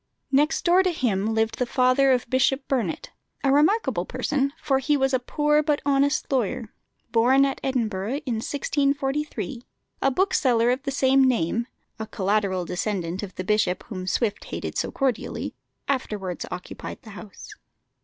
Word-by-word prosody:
Next 295 Hz, +4 st, +2 dB
door 355 Hz, +2 st, +5 dB
to 370 Hz, -1 st, +1 dB
him 220 Hz, -, 0 dB
lived 220 Hz, 0 st, 0 dB
the 250 Hz, -, 0 dB
father 255 Hz, +2 st, +3 dB
of 250 Hz, -1 st, +1 dB
Bishop 265 Hz, +2 st, +1 dB
Burnet 235 Hz, -11 st, -2 dB, 0.3 s
a 270 Hz, -, +3 dB
remarkable 315 Hz, +11 st, +3 dB
person, 280 Hz, -2 st, -1 dB
for 270 Hz, -2 st, +1 dB
he 290 Hz, +2 st, +1 dB
was 270 Hz, 0 st, +1 dB
a 260 Hz, -, +3 dB
poor 300 Hz, +4 st, +2 dB
but 295 Hz, -1 st, +1 dB
honest 285 Hz, +1 st, +1 dB
lawyer, 245 Hz, -2 st, -1 dB, 0.4 s
born 255 Hz, +4 st, +5 dB
at 275 Hz, -, -3 dB
Edinburgh 225 Hz, -4 st, -1 dB
in 240 Hz, -4 st, -1 dB
1643. 280 Hz, -1 st, -1 dB, 0.4 s
A 270 Hz, -, +4 dB
bookseller 255 Hz, -7 st, +2 dB
of 255 Hz, +2 st, -1 dB
the 275 Hz, -, -3 dB
same 270 Hz, 0 st, +3 dB
name 235 Hz, -2 st, +1 dB, 0.3 s
a 220 Hz, -, -4 dB
collateral 195 Hz, -3 st, 0 dB
descendant 180 Hz, -1 st, -2 dB
of 195 Hz, -3 st, -7 dB
the 185 Hz, -, -4 dB
bishop 210 Hz, -3 st, +1 dB
whom 185 Hz, -4 st, -5 dB
Swift 210 Hz, 0 st, -1 dB
hated -, -, -5 dB
so -, -, -1 dB
cordially 260 Hz, -5 st, -2 dB, 0.3 s
afterwards 210 Hz, -9 st, -3 dB
occupied 180 Hz, 0 st, -7 dB
the 220 Hz, -, -11 dB
house. 205 Hz, 0 st, -11 dB
255 Hz, 155 wpm, -25 LUFS, 215-275 Hz, 0.4 s, door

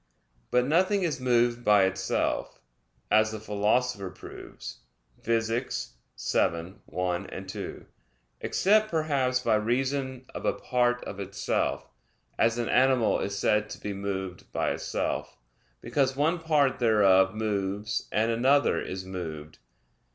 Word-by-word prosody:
But 125 Hz, 0 st, +3 dB
nothing 185 Hz, +7 st, +2 dB
is 165 Hz, -6 st, -1 dB
moved 120 Hz, -1 st, +2 dB
by 105 Hz, -3 st, +5 dB
itself, 95 Hz, 0 st, -1 dB, 0.5 s
as 110 Hz, +1 st, +4 dB
the 110 Hz, -, -5 dB
Philosopher 105 Hz, 0 st, 0 dB
proves -, -, -10 dB, 0.4 s
(Phys. 115 Hz, -, -1 dB, 0.3 s
vii, 85 Hz, +2 st, 0 dB
1,2); 90 Hz, +1 st, -4 dB, 0.6 s
except, 215 Hz, +2 st, +3 dB
perhaps, 140 Hz, -6 st, +1 dB
by -, -, +2 dB
reason 130 Hz, +4 st, -1 dB
of -, -, -6 dB
a -, -, +2 dB
part 125 Hz, -1 st, 0 dB
of 100 Hz, -, -7 dB
itself, 100 Hz, 0 st, -2 dB, 0.5 s
as 115 Hz, +1 st, +3 dB
an 120 Hz, -1 st, -1 dB
animal 130 Hz, -3 st, +3 dB
is 100 Hz, 0 st, -3 dB
said 105 Hz, +1 st, +1 dB
to -, -, -8 dB
be 105 Hz, -, -4 dB
moved 95 Hz, -2 st, -5 dB
by -, -, 0 dB
itself, -, -, -3 dB, 0.4 s
because 130 Hz, +2 st, 0 dB
one 160 Hz, +5 st, +1 dB
part 150 Hz, -5 st, +2 dB
thereof 100 Hz, -4 st, +4 dB
moves 105 Hz, -1 st, -2 dB
and 110 Hz, +2 st, +2 dB
another 135 Hz, +5 st, +3 dB
is 95 Hz, 0 st, -5 dB
moved. 80 Hz, -5 st, -7 dB
115 Hz, 120 wpm, -28 LUFS, 100-130 Hz, 0.6 s, by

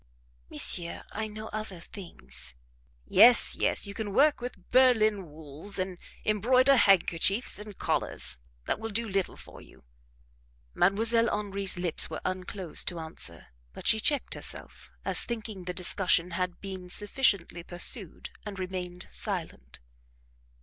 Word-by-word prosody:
"Monsieur, 170 Hz, -1 st, +1 dB
I 220 Hz, +1 st, -3 dB
know 215 Hz, +1 st, -8 dB
other 215 Hz, -4 st, -4 dB
things." 70 Hz, -, -7 dB, 0.5 s
"Yes, 235 Hz, -, +6 dB
yes, -, -, +1 dB
you 200 Hz, -, -6 dB
can 205 Hz, -1 st, -5 dB
work 295 Hz, -1 st, +4 dB
with 245 Hz, +1 st, -8 dB
Berlin 220 Hz, -8 st, +4 dB
wools, 155 Hz, +5 st, -5 dB
and 185 Hz, -1 st, -3 dB, 0.3 s
embroider 255 Hz, +6 st, +4 dB
handkerchiefs 195 Hz, 0 st, +3 dB
and 210 Hz, -2 st, -9 dB
collars -, -, 0 dB, 0.3 s
that -, -, -1 dB
will 225 Hz, 0 st, -5 dB
do 225 Hz, +2 st, -1 dB
little 195 Hz, -2 st, -2 dB
for -, -, -13 dB
you." -, -, -18 dB, 0.9 s
Mdlle. 225 Hz, +5 st, +4 dB
Henri's 200 Hz, -2 st, +1 dB
lips 175 Hz, -2 st, +3 dB
were 160 Hz, -, -6 dB
unclosed 185 Hz, -1 st, -2 dB
to 175 Hz, -, 0 dB
answer, 90 Hz, -, -5 dB, 0.2 s
but -, -, -10 dB
she 220 Hz, -, +4 dB
checked 290 Hz, +4 st, 0 dB
herself, -, -, -4 dB, 0.2 s
as -, -, +3 dB
thinking 215 Hz, -5 st, -6 dB
the 180 Hz, -, -3 dB
discussion 180 Hz, -1 st, +2 dB
had 180 Hz, +1 st, -3 dB
been 190 Hz, -2 st, -7 dB
sufficiently 200 Hz, -4 st, 0 dB
pursued, 175 Hz, +2 st, -2 dB
and 205 Hz, -2 st, -7 dB
remained 180 Hz, -1 st, -5 dB
silent. -, -, -5 dB
195 Hz, 135 wpm, -28 LUFS, 175-220 Hz, 0.9 s, Yes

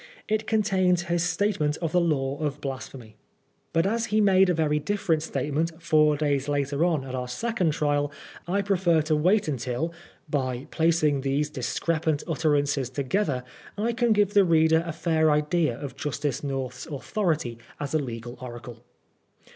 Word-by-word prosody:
It 215 Hz, 0 st, -1 dB
contains 190 Hz, -5 st, +2 dB
his 175 Hz, -1 st, 0 dB
statement 175 Hz, -4 st, 0 dB
of 165 Hz, -3 st, -3 dB
the 180 Hz, -, +3 dB
Law 140 Hz, -4 st, 0 dB
of 145 Hz, -2 st, -2 dB
Blasphemy. 130 Hz, -5 st, -7 dB, 0.5 s
But 165 Hz, +1 st, +2 dB
as 225 Hz, +3 st, 0 dB
he 215 Hz, -1 st, +1 dB
made 190 Hz, -2 st, +5 dB
a -, -, +3 dB
very 150 Hz, -2 st, +1 dB
different 165 Hz, -1 st, 0 dB
statement 160 Hz, +1 st, -2 dB
four 155 Hz, -3 st, +3 dB
days 140 Hz, -2 st, 0 dB
later 145 Hz, +1 st, 0 dB
on 165 Hz, -6 st, +1 dB
at 130 Hz, -, -7 dB
our 125 Hz, -1 st, -3 dB
second 180 Hz, -, -1 dB
trial, 145 Hz, -1 st, 0 dB, 0.4 s
I 200 Hz, +3 st, 0 dB
prefer 175 Hz, -5 st, +2 dB
to 155 Hz, 0 st, +1 dB
wait 185 Hz, +7 st, +3 dB
until, 130 Hz, +4 st, -2 dB, 0.3 s
by 130 Hz, -3 st, -2 dB
placing 160 Hz, -4 st, +2 dB
these 140 Hz, +2 st, 0 dB
discrepant 155 Hz, +3 st, -1 dB
utterances 145 Hz, -5 st, +1 dB
together, 140 Hz, +1 st, -1 dB, 0.3 s
I 230 Hz, +3 st, 0 dB
can 240 Hz, 0 st, +1 dB
give 205 Hz, -1 st, +3 dB
the 200 Hz, -, +6 dB
reader 160 Hz, -1 st, +4 dB
a -, -, -2 dB
fair 160 Hz, -1 st, +1 dB
idea 150 Hz, -3 st, +1 dB
of 135 Hz, -3 st, -6 dB
Justice 145 Hz, -1 st, -2 dB
North's 130 Hz, -2 st, -4 dB
authority 155 Hz, -, -2 dB, 0.2 s
as 145 Hz, 0 st, -4 dB
a 155 Hz, -, +3 dB
legal 120 Hz, -2 st, -6 dB
oracle. 120 Hz, -1 st, -9 dB
155 Hz, 160 wpm, -26 LUFS, 140-175 Hz, 0.5 s, the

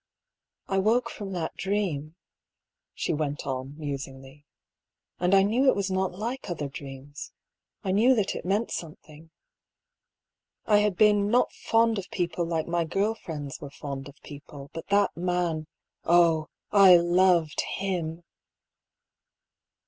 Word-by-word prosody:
" -, -, -56 dB
I -, -, +3 dB
woke 225 Hz, +5 st, +2 dB
from 200 Hz, -2 st, -7 dB
that 170 Hz, -3 st, -3 dB
dream," 175 Hz, -7 st, -2 dB, 0.8 s
she -, -, -1 dB
went 145 Hz, -1 st, -3 dB
on, 135 Hz, +2 st, -4 dB
musingly; 135 Hz, -1 st, -7 dB, 0.3 s
" -, -, -55 dB
and 180 Hz, +2 st, +3 dB
I 195 Hz, -, +6 dB
knew 235 Hz, +7 st, +2 dB
it -, -, +3 dB
was 195 Hz, -1 st, -1 dB
not 190 Hz, 0 st, 0 dB
like 235 Hz, +3 st, -4 dB
other 155 Hz, -5 st, -3 dB
dreams. 140 Hz, +1 st, -9 dB, 0.5 s
I 190 Hz, -, -1 dB
knew 235 Hz, +7 st, +4 dB
that 210 Hz, -4 st, 0 dB
it -, -, -6 dB
meant 200 Hz, +5 st, 0 dB
something. 160 Hz, -1 st, -8 dB, 1.4 s
I 210 Hz, -1 st, +5 dB
had 210 Hz, -2 st, +1 dB
been 205 Hz, -1 st, +4 dB
not 245 Hz, +3 st, +3 dB
fond 225 Hz, -1 st, +1 dB
of 190 Hz, -, -8 dB
people 175 Hz, 0 st, -2 dB
like 165 Hz, -2 st, -1 dB
my 170 Hz, 0 st, 0 dB
girl 195 Hz, +7 st, 0 dB
friends 150 Hz, -9 st, -7 dB
were 145 Hz, -, -7 dB
fond 140 Hz, -1 st, -7 dB
of 140 Hz, -, -15 dB
people; 145 Hz, -1 st, -11 dB
but 165 Hz, -, -7 dB
that 200 Hz, 0 st, +2 dB
man, 175 Hz, -3 st, -1 dB, 0.4 s
oh! 165 Hz, -2 st, +4 dB, 0.2 s
I 195 Hz, -3 st, +8 dB
loved 175 Hz, -2 st, +3 dB
him 175 Hz, -4 st, -3 dB
175 Hz, 145 wpm, -27 LUFS, 150-200 Hz, 1.4 s, I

